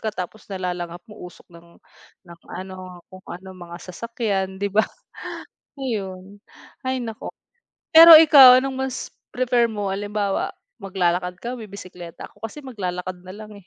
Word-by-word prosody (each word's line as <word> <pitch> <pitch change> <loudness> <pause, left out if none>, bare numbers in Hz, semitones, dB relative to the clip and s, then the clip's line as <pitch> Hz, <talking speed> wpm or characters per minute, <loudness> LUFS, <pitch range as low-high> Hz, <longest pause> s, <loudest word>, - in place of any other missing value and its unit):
ka 220 -1 -3
tapos 190 +2 -7
nalalanghap 180 -2 -5
mo 210 - -13
usok 180 - -14
ng 170 0 -17 0.5
ng 170 -1 -14 0.2
ano, 185 -1 -9
kung 185 0 -13
ano 190 +2 -10
mga 175 -1 -10 0.2
sasakyan, 200 -4 -3
'di 200 - 0
ba? 215 +1 +4 0.9
Ayon. 200 -6 -5 0.5
Hay 260 0 -1
naku. 225 -1 -7 0.6
Pero 330 0 +11
ikaw 280 -5 +9
anong 270 0 -4
mas 255 - -6 0.2
prefer 245 -1 +2
mo 205 -2 -3
halimbawa 205 0 -2 0.3
maglalakad 180 -2 -1
ka, 235 - -5
bibisekleta? 185 -5 -10
Ako - - -26
kasi 295 +7 -12
maglalakad 185 -6 -5
nalang 210 +2 -10
eh, 185 - -27
195 Hz, 140 wpm, -22 LUFS, 180-225 Hz, 0.9 s, Pero